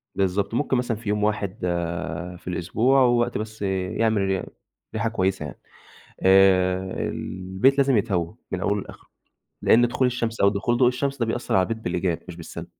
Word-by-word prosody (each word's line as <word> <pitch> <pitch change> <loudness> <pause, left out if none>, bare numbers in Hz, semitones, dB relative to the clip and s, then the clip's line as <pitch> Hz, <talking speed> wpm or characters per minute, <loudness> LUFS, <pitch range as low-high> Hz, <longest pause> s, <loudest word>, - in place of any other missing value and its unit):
بالضبط 100 +2 0
ممكن 130 +1 +1
مثلًا 120 -2 -1
في 110 -1 -6
يوم 105 0 0
واحد 105 -2 -1 0.8
في - - -19
الأسبوع 110 +10 +2
ووقت 120 -1 +2
بس 110 0 -7
يعمل 100 +3 0
ري 95 -1 0 0.5
ريحة 115 +1 0
كويسة 95 -6 -1
يعني، 75 - -9 0.6
آآ 95 -1 +5 0.3
البيت 95 +9 0
لازم 135 -3 +4
يتهوى 95 -4 -1 0.2
من 95 - -2
أوله 100 0 0
لآخره، - - -13 0.5
لإن 120 +1 +5
دخول 130 +2 +1
الشمس 115 -2 -2
أو 100 - +6
دخول 105 +4 0
ضوء 125 -1 +5
الشمس 140 +2 -2
ده 115 - 0
بيأثر 115 +2 -2
على 95 - +5
البيت 115 +4 -2
بالإيجاب 90 -1 -1
مش 90 - -8
بالسلب. 85 0 -8
105 Hz, 170 wpm, -24 LUFS, 95-120 Hz, 0.8 s, أو